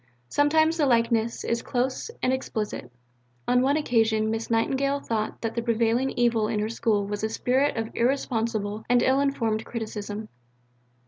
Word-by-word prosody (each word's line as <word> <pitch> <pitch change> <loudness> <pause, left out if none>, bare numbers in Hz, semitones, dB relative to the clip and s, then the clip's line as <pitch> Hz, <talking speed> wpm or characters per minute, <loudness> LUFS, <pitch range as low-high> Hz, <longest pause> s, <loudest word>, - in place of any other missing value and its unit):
Sometimes 315 - +3
the 295 -3 +2
likeness 230 -1 +1
is 235 0 -1
close 255 - -2
and 255 - +2
explicit. 215 - -4 0.6
On 250 0 +4
one 280 +3 +2
occasion 225 -6 +2
Miss 225 0 -3
Nightingale 270 +5 +1
thought 220 -5 -3
that 225 -1 -2
the 235 - -1
prevailing 235 +2 +1
evil 235 -3 +2
in 215 -1 -1
her 215 +1 -1
School 225 -3 0
was 205 +1 -4
a 220 - +1
spirit 260 +4 +1
of 225 0 -3
irresponsible 225 -4 -1
and 245 0 +4
ill 265 +1 +3
informed 230 -6 0
criticism. 215 -2 -5
230 Hz, 155 wpm, -26 LUFS, 220-260 Hz, 0.6 s, On